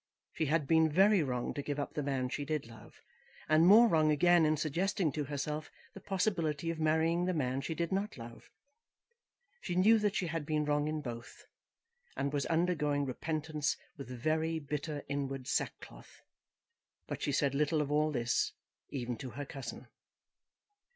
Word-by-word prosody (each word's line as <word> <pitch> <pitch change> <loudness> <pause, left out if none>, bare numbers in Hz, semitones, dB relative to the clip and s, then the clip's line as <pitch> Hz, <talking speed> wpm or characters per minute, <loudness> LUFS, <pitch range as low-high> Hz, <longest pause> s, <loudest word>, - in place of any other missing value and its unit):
She 160 - -1
had 155 0 +1
been 160 +1 +4
very 195 +3 +5
wrong 125 -4 -2
to 145 - -3
give 145 0 -3
up 145 - -3
the 150 - -2
man 135 -2 -1
she 145 - -3
did 150 0 -2
love, 115 -2 -14 0.5
and 155 +2 +5
more 225 +5 +8
wrong 155 -6 +3
again 165 +2 +5
in 155 0 +2
suggesting 165 +2 0
to 145 +2 -3
herself 150 +2 -4 0.2
the - - -9
possibility 170 -5 -1
of 165 - -6
marrying 160 +2 +2
the 185 -1 0
man 130 -3 -1
she 160 +3 -4
did 170 0 -2
not 195 0 -2
love. 115 -1 -11 1.1
She 175 - -3
knew 215 +5 +5
that 210 -1 0
she 185 - 0
had 165 -2 -3
been 150 0 0
wrong 145 0 +1
in 155 0 -2
both, 120 -2 -8 0.7
and 140 +1 -1
was 140 -2 0
undergoing 155 -4 +1
repentance 155 +2 -2 0.2
with 140 -3 -9
very 155 +6 -1
bitter 150 0 -4
inward 135 -2 -3
sackcloth. - - -4 0.8
But - - -6
she - - 0
said 140 -1 +1
little 150 +2 +1
of 145 -1 -1
all 150 +1 +3
this 125 -4 0 0.4
even 125 -3 -4
to 130 - -6
her 145 +3 -6
cousin. 135 -1 -8
150 Hz, 170 wpm, -33 LUFS, 140-165 Hz, 1.1 s, more